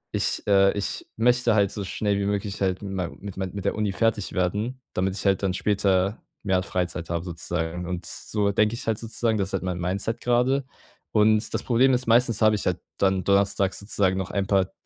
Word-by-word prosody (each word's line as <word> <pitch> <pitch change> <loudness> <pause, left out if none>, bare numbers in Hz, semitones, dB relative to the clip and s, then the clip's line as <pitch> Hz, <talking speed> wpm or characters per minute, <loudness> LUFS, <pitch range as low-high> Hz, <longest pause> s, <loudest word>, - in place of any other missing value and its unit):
ich - - 0
äh, 100 -1 +5
ich 100 - -3
möchte 120 0 +3
halt 100 -2 +3
so 100 - -4
schnell 100 +1 -1
wie 100 - -1
möglich 100 0 -2
halt 95 0 0
mit 100 - -5
mei 90 -3 -2
mit 100 -1 -8
mei 95 - -2
mit 100 +1 -7
der 100 - +1
Uni 105 -1 0
fertig 110 -1 0
werden, 105 +8 -1
damit 95 +1 0
ich - - -6
halt 100 -1 +3
dann 95 -2 +1
später 100 0 +1 0.2
mehr 95 -3 +2
Freizeit 90 -2 -3
habe, 85 0 -2
sozusagen, 85 0 -3
und 90 -1 -4
so 105 -1 -1
denke 105 +2 +2
ich 125 - -8
halt 110 - +1
sozusagen, 115 -1 -1
das 95 -1 -1
ist - - -11
halt 95 - -1
mein 90 -1 -3
Mindset 95 +6 -2
grade. 125 +3 +2 0.5
Und 110 +1 +3
das - - -1
Problem 130 +2 +3
ist, 125 0 0
meistens 115 -1 +3
habe 110 0 +5
ich 105 - -4
halt 90 - 0 0.2
dann 95 -1 +2
donnerstags 100 0 +2
sozusagen 100 -2 0
noch 95 -1 -3
ein 100 -1 -1
paar 95 -2 +2
100 Hz, 220 wpm, -25 LUFS, 95-110 Hz, 0.5 s, äh